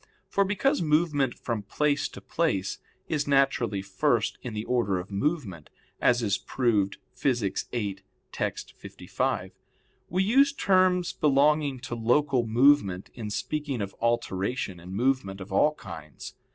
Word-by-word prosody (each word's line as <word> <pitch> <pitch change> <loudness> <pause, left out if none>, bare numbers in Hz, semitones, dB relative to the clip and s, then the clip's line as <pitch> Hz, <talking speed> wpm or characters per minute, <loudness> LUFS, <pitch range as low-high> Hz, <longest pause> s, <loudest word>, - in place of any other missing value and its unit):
For 200 - +2
because 240 +9 +1
movement 150 -4 +2
from 115 -3 -3
place 145 +8 0
to - - -11
place 125 - -1 0.3
is 150 -2 -1
naturally 130 -8 +2
first 95 -1 0
in 115 -3 -6
the 105 - -3
order 115 -6 +1
of 90 +3 -6
movement 100 - -2 0.3
as 120 -1 +3
is 100 -3 +1
proved 105 -6 0 0.2
Phys. 120 -7 -1
viii, 100 -5 -3 0.3
text. - - -4
55, - - -3 0.6
we 185 +3 +1
use 275 +7 +4
terms 185 -7 +2
belonging 145 -1 +2
to 130 -2 -6
local 125 +2 +2
movement 115 -6 +3
in 110 -4 -6
speaking 145 +3 -3
of 100 -1 -4
alteration 115 -4 -1
and 90 +2 -10
movement 115 -2 0
of 95 +1 -8
all 150 +10 +3
kinds. 80 - -9
125 Hz, 140 wpm, -27 LUFS, 100-150 Hz, 0.6 s, use